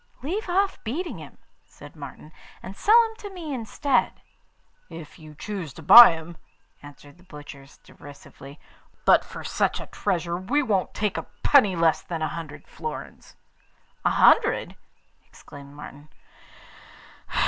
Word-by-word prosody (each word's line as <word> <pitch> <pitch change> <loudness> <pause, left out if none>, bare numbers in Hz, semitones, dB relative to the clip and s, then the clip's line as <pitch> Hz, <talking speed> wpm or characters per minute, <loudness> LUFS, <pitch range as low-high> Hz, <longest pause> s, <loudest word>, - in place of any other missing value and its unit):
'Leave 375 +8 -4
off 390 +2 0
beating 315 +11 -5
him,' - - -13 0.3
said - - -15
Martin, 145 +1 -11 0.3
'and 190 +1 -9
sell 440 - +5
him 445 - -13
to 410 - -9
me 340 -6 -7
instead.' 250 +2 -1 0.7
'If 165 -3 -11
you 155 -1 -14
choose 180 -5 -7
to 160 - -12
buy 235 +4 +10
him,' 165 +1 -9 0.4
answered 145 +2 -15
the - - -20
butchers 145 -5 -13
derisively; 140 0 -14 0.5
'but - - +5
for - - -10
such - - -1
a - - -8
treasure 175 -4 -3
we 285 +11 -1
won't 205 -7 -1
take 210 -2 -2
a - - -6 0.2
penny 210 -10 +4
less 165 -1 +2
than 165 -2 -5
a 155 - -1
hundred 150 -3 -9
florins.' 155 -2 -9 0.7
'A - - +3
hundred!' - - +3 0.5
exclaimed 140 0 -14
Martin. 145 0 -12
170 Hz, 140 wpm, -24 LUFS, 150-245 Hz, 0.7 s, buy